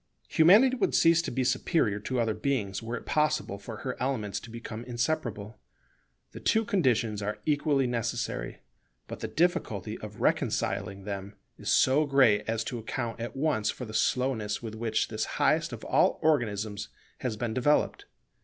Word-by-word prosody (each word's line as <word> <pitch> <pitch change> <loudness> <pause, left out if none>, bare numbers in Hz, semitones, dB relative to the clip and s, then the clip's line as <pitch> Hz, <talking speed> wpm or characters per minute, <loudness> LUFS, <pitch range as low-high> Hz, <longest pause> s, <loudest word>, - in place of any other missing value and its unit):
Humanity 210 +11 +6
would 215 - +1
cease 165 0 +5
to - - -4
be 130 +2 -1
superior 125 -4 +1
to 125 +4 -2
other 115 -2 +1
beings 110 -7 -2
were 115 +1 -4
it - - -10
possible 150 -10 0
for 110 +2 -8
her 130 - -2
elements 110 -7 -1
to - - -12
become 115 0 -7
inseparable. 120 -4 -3 0.7
The - - -9
two 220 0 +2
conditions 120 - +1
are 105 +1 -3
equally 145 -2 +2
necessary: 120 0 -3 0.5
but - - -7
the - - -3
difficulty 115 - -1
of 105 -1 -9
reconciling 100 0 0
them 100 0 -6 0.2
is - - -4
so 145 +3 +4
great 125 -7 +4
as 115 0 0
to 120 +1 -4
account 115 +1 -4
at 120 +3 -5
once 135 -7 +1
for 125 - -4
the 110 - -9
slowness 110 -3 0
with 110 -2 -7
which 110 0 -1
this - - -2
highest - - +2
of - - -8
all - - +3
organisms 105 -8 0 0.3
has 120 -4 -3
been 115 -1 -2
developed. 140 +5 +1
120 Hz, 165 wpm, -28 LUFS, 105-140 Hz, 0.7 s, Humanity